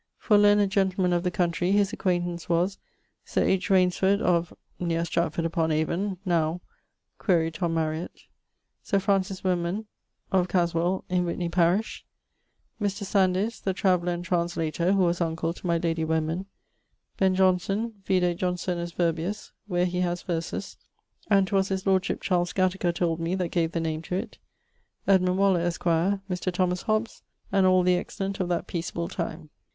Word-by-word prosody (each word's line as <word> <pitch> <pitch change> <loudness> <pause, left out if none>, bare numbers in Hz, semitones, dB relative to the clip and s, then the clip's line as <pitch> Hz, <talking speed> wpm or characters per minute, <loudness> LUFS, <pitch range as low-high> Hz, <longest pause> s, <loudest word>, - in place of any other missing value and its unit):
For 215 - +2
learned 205 -1 +5
gentlemen 190 -2 +1
of 175 - +2
the 180 - 0
country, 175 +1 0
his 205 -1 +2
acquaintance 175 -2 -1
was 175 +3 +1 0.4
Sir - - 0
H. 190 -1 +1
Rainesford, 190 +1 +3
of... 175 -4 +1 0.3
neer 170 -1 0
Stratford 165 0 -1
upon 165 -1 0
Avon, 170 +5 -1
now... 165 -1 +1 0.6
(quaere 165 -5 +2
Tom 165 0 -2
Mariet); 160 +1 -3 0.6
Sir 200 - 0
Francis 195 -1 0
Wenman, 180 +3 -1 0.5
of 185 -2 +2
Caswell, 175 +1 0
in 180 0 +1
Witney 170 0 -2
parish; 180 +5 +1 0.8
Mr.... 200 0 -1
Sandys, 195 +3 +1
the 190 -1 -1
traveller 180 -3 +2
and 175 0 -5
translator 170 0 0
(who 195 -2 +3
was 175 0 +1
uncle 165 0 -1
to 180 - -7
my 170 -1 +2
lady 165 -1 -1
Wenman); 160 +3 -1 0.7
Ben. 190 -1 +3
Johnson 190 +4 +1
(vide 180 -2 +2
Johnsonus 180 -1 -2
Virbius, 170 +4 -2 0.2
where 180 -2 +1
he 180 0 -2
haz 175 -1 -1
verses, 165 -2 -4 0.5
and 195 -2 +5
'twas 195 -1 +1
his 190 -1 -3
lordship, 190 -1 +1
Charles 175 -2 0
Gattaker 185 -1 +1
told 170 -1 -1
me, 165 +2 -1
that 180 -3 -1
gave 165 -2 0
the 170 - 0
name 160 -1 -2
to 180 - -4
it); 185 - -5 0.7
Edmund 185 -1 +3
Waller, 195 -2 +3
esq.; 170 0 -2
Mr. 185 +2 0
Thomas 180 0 0
Hobbes, 215 +1 -1 0.3
and 195 -1 +4
all 185 -1 +4
the 180 0 +3
excellent 195 +2 -4
of 180 -2 -1
that 175 -1 -1
peaceable 170 0 -3
time. 160 -3 -5
180 Hz, 160 wpm, -26 LUFS, 170-190 Hz, 0.8 s, learned